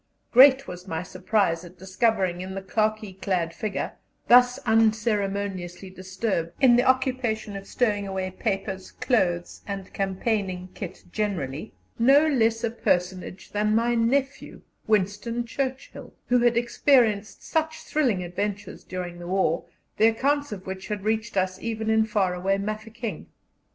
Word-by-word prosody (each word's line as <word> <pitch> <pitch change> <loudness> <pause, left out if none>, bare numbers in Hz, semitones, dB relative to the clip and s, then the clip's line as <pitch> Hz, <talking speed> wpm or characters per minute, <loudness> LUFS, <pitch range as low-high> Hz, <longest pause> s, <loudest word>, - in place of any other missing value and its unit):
Great 265 +2 +7
was 180 +1 -8
my 160 -1 -3
surprise 185 -2 0
at 180 +1 -13
discovering 190 -1 0
in 190 +1 -6
the 195 - -4
khaki 215 0 -1
clad 180 -3 -1
figure, 210 +2 -3 0.4
thus 245 +1 +7
unceremoniously 200 -5 0
disturbed 185 -2 -3
in 250 -3 +6
the 245 - +5
occupation 255 -5 0
of 195 0 -7
stowing 205 -5 0
away 190 -1 -3
papers, 195 -1 -3
clothes, 175 -8 0
and 195 -2 -6
campaigning 195 -1 -2
kit 190 - -8
generally, 180 -6 -3 0.3
no 275 +6 +6
less 230 -6 +2
a 230 - 0
personage 185 -3 -2
than 210 +1 +1
my 235 +1 +2
nephew, 260 +4 -1 0.2
Winston 215 +3 0
Churchill, 260 +2 -5
who 250 0 +4
had 240 -1 +3
experienced 235 -3 +2
such 315 -1 -2
thrilling 245 -12 0
adventures 200 +3 -4
during 180 -1 -6
the 175 - -8
war, 180 -3 +1 0.3
the 220 - +6
accounts 285 +5 +1
of 190 -3 -7
which 190 0 -6
had 210 -2 -4
reached 215 -1 -1
us 185 0 0
even 220 -1 -2
in 220 0 +4
far 205 -4 +1
away 190 +2 0
Mafeking. 215 0 -5
210 Hz, 140 wpm, -25 LUFS, 185-230 Hz, 0.4 s, Great